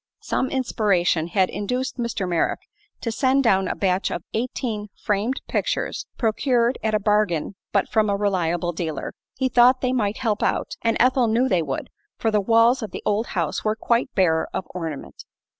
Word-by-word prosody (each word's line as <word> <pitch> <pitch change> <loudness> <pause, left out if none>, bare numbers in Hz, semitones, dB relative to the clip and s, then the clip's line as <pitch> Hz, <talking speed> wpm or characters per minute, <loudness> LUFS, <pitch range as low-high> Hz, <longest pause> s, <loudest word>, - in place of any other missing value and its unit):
Some 260 - -1
inspiration 195 -10 +1
had 185 +1 +1
induced 250 +6 -3
Mr. 235 -5 -2
Merrick 170 -2 0 0.4
to 230 - -2
send 265 +3 +2
down 195 -5 +3
a - - -2
batch 185 0 0
of - - -4
eighteen 225 -2 -3
framed 215 +6 -1
pictures, - - -2
procured 240 +1 +1
at 220 -1 0
a - - +2
bargain 205 -5 +1 0.2
but 200 - +2
from 215 -2 +2
a 200 - +2
reliable 175 -4 0
dealer. 160 -3 -4 0.2
He 260 - 0
thought 250 +1 +5
they 255 0 +1
might 215 -4 0
"help 220 -4 -1
out," - - 0
and 230 -1 +1
Ethel 255 0 +4
knew 235 +4 +2
they 185 -8 +2
would, 140 -4 -4 0.3
for 225 - 0
the 210 -1 +2
walls 230 +5 +4
of 220 - -4
the - - -7
old 210 +3 +1
house 165 -3 -1
were 215 0 +1
quite 235 +3 +1
bare 165 -4 +2
of 190 - -2
ornament. 165 -5 -6
215 Hz, 180 wpm, -23 LUFS, 185-240 Hz, 0.4 s, thought